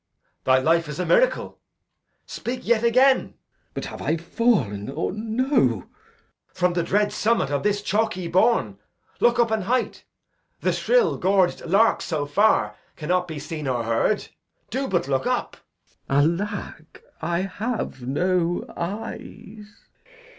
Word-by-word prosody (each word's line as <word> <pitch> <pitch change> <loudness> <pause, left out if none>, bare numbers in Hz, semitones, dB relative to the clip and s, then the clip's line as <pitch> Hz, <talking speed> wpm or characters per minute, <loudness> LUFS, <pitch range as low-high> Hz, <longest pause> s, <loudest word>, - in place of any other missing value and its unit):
Thy 130 0 +5
life 165 +4 +2
is 150 - -6
a 180 - 0
miracle. - - +2 0.7
Speak 250 +1 -5
yet 235 -1 +2
again. 255 +3 +4
Glou. - - -22 0.4
But - - -4
have - - -8
I 160 - 0
fall'n, 160 - 0
or 135 - -2
no? 220 - +1
Edg. - - -26 0.6
From 180 -1 +1
the 175 - +1
dread 205 +5 +1
summit 220 -10 +1
of 140 -1 0
this 205 0 0
chalky 205 -4 0
bourn. 170 - +2 0.4
Look 240 0 +3
up 235 -2 +2
a 220 -1 +1
height. 245 +7 -1 0.6
The - - +1
shrill - - +2
gorg'd 190 -1 +2
lark 210 +6 +3
so 155 -4 -2
far 145 - +2 0.2
Cannot 180 +3 -1
be 160 -2 -6
seen 155 0 -5
or 125 -3 0
heard. 115 - 0 0.4
Do 270 +1 -1
but 175 -7 0
look 135 -1 0
up. - - -1 0.5
Glou. 150 +5 +3
Alack, 195 -6 -9 0.2
I 170 +2 0
have 205 - -4
no 175 +6 0
eyes! 205 +2 -7
185 Hz, 145 wpm, -24 LUFS, 150-220 Hz, 0.7 s, Thy